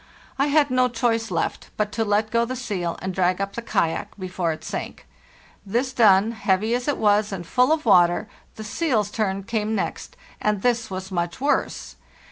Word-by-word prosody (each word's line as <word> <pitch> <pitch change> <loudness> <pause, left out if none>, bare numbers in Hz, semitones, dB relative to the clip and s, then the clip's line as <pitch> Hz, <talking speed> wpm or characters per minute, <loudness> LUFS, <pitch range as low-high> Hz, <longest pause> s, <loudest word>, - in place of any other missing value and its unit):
I 275 - +3
had 290 -1 +3
no 255 0 +3
choice 230 -1 0
left - - -2
but 210 -1 0
to 225 - -1
let 210 +1 +1
go 235 0 +3
the 255 +2 -3
seal 190 -9 -3
and 190 0 -2
drag 180 0 +1
up 195 0 -3
the 235 - -4
kayak 170 -7 -1
be. 185 -2 -5
fore 180 -2 -1
it 155 - -7
sank. - - -6 0.6
This 240 +6 -1
done, 215 -2 +5
heavy 215 0 0
as 245 +2 -1
it 290 - +1
was 210 0 +2
and 180 -3 -5
full 250 - +2
of 315 -2 +1
water, 180 -1 +4 0.3
the 220 - -7
seal's 215 -3 0
turn 195 -3 -1
came 220 0 -1
next, - - -4 0.2
and 210 -2 0
this 235 -2 +1
was 190 0 -6
much 175 +2 -2
worse. 285 +2 -1
215 Hz, 195 wpm, -23 LUFS, 190-240 Hz, 0.6 s, done